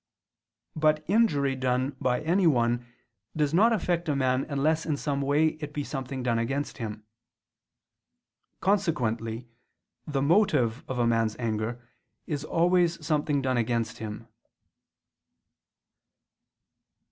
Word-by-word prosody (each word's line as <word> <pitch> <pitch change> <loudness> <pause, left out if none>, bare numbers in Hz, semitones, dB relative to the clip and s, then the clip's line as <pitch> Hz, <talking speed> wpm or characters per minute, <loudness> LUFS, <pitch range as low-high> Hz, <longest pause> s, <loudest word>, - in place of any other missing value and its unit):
But 155 0 +2
injury 155 -10 +2
done 130 +1 -1
by 125 -1 +1
anyone 130 -9 +2 0.5
does 150 -1 0
not 215 +7 +5
affect 175 -6 0
a 145 - +1
man 130 -1 +1
unless 155 +3 +1
in 150 -3 -1
some 140 -1 -2
way 145 +3 +3
it 150 -1 -6
be 145 - -1
something 135 -2 -5
done 120 -2 +1
against 135 +5 -3
him. 105 -2 -6 1.6
Consequently 120 - 0 0.6
the 140 -3 -1
motive 145 - +2
of 130 - -3
a 120 - +2
man's 115 -2 +1
anger 115 +1 -3 0.4
is 145 -2 -3
always 170 0 +2
something 145 -2 0
done 130 -1 +1
against 115 -1 -1
him. 110 +1 -7
140 Hz, 115 wpm, -27 LUFS, 120-155 Hz, 1.6 s, not